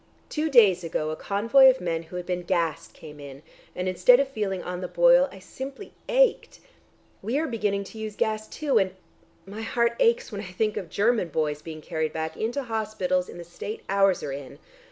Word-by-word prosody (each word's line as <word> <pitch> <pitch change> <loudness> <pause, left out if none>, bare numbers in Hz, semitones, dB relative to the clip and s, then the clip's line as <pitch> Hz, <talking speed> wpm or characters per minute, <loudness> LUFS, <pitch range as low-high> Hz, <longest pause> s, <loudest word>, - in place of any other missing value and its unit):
Two 315 +1 -1
days 205 - +5
ago 155 -2 -2
a - - -3
convoy 230 - +5
of 260 0 +2
men 165 -2 -2
who 165 +2 -12
had 180 -1 -4
been 180 -1 -2
gassed 170 -3 -1
came 150 -2 -12
in, 140 0 -10 0.3
and 180 +1 -3
instead 185 +7 +5
of 275 - +2
feeling 205 -8 -3
on 180 0 -5
the 180 - -3
boil, - - +5
I - - -12
simply 270 +8 -9 0.2
ached. - - +2 0.6
We 230 +7 -1
are 315 - 0
beginning 210 -6 -1
to 220 +3 -11
use 215 -1 -5
gas 215 0 -1
too, 300 -3 +1
and... 190 -1 -1 0.5
my 205 +3 -8
heart 235 +1 0
aches 475 - +2
when 200 -1 -5
I 180 -3 -9
think 215 +3 -1
of 180 - -5
German 210 +1 +1
boys 150 -2 -2
being 155 -1 -8
carried 155 +1 -3
back 160 0 -4
into 240 +6 -2
hospitals 210 -6 -1
in - - -10
the 175 - -7
state 175 +5 -7
ours 195 -1 +3
are 140 - -4
in. 135 -1 -8
200 Hz, 205 wpm, -26 LUFS, 175-235 Hz, 0.6 s, days